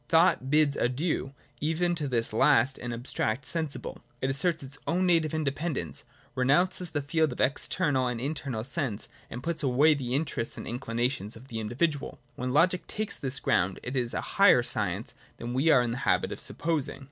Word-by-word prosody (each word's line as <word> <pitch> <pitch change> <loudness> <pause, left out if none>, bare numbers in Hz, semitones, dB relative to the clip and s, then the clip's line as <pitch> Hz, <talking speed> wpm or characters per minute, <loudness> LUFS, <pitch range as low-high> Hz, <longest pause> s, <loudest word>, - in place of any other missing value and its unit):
Thought 160 -5 +4
bids 150 -1 +3
adieu 135 +2 -1 0.3
even 165 +3 0
to 155 -4 -2
this 115 -4 0
last 135 +1 +4
and 120 - -5
abstract 120 +1 -2
sensible: 160 -1 -3 0.2
it 130 +1 0
asserts 155 +3 +1
its 135 +2 -5
own 180 +3 +1
native 165 -4 +3
independence, 155 0 -3 0.3
renounces 170 +8 +2
the 145 -3 -2
field 155 -1 +1
of - - -11
the - - +2
external 140 -1 0
and 120 -1 -2
internal 135 -4 -3
sense, 130 -5 -2 0.2
and 120 +2 -7
puts 170 0 -2
away 145 +3 +4
the 130 -3 -2
interests 140 -6 -2
and - - -7
inclinations 120 -2 -2
of 125 +4 -14
the 115 - -4
individual. 140 +7 -1 0.2
When 125 +1 -3
Loo 150 +5 +6
ic 180 0 -1
takes 215 0 -2
this 135 0 -1
ground, 90 +1 +1
it 125 +2 -4
is 120 -2 0
a - - -1
higher - - +5
science - - -1 0.2
than 120 +1 -5
we 135 +6 +2
are 135 -5 +6
in 120 - -2
the 120 - -3
habit 90 -8 +1
of - - -5
supposing. 160 -4 -1
135 Hz, 190 wpm, -28 LUFS, 125-160 Hz, 0.3 s, Loo